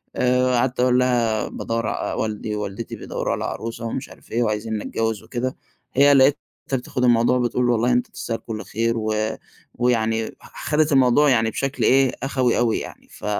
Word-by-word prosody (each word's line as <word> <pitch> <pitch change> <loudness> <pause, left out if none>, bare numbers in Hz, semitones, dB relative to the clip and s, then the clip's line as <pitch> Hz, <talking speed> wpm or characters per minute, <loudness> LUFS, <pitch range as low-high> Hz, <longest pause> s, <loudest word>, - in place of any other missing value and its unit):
آآ، 125 0 +2
قعدت 125 +1 0
أقول 125 0 +4
لها 120 -4 +1
بادوَّر 115 -1 -3
ع - - -2
والدي 105 0 -3
ووالدتي 105 +2 -5
بيدوَّروا - - -3
على - - -3
عروسة، 115 +1 -5
ومش 130 +4 -4
عارف - - -17
إيه 120 +1 +1
وعايزينّي 110 0 -2
أتجوز 110 -2 -2
وكده، 130 +1 -3 0.4
هي 140 +2 +6
لقيتها 135 +2 +5 0.4
بتاخد 125 0 -2
الموضوع 120 +1 +4
بتقول 120 0 +1
والله 120 +1 +2
أنت 125 0 +1
تستاهل 115 -1 -4
كل 110 -1 -6
خير، 115 +1 0
و 110 0 -1 0.6
ويعني 115 -2 0
خدت 155 0 -1
الموضوع 135 +2 +5
يعني 115 -3 +3
بشكل 135 +5 -2
إيه 135 -1 +4
أخَوي 130 -3 +1
أوي 120 -2 +2
يعني، - - -10
ف - - -11
120 Hz, 170 wpm, -22 LUFS, 115-125 Hz, 0.6 s, هي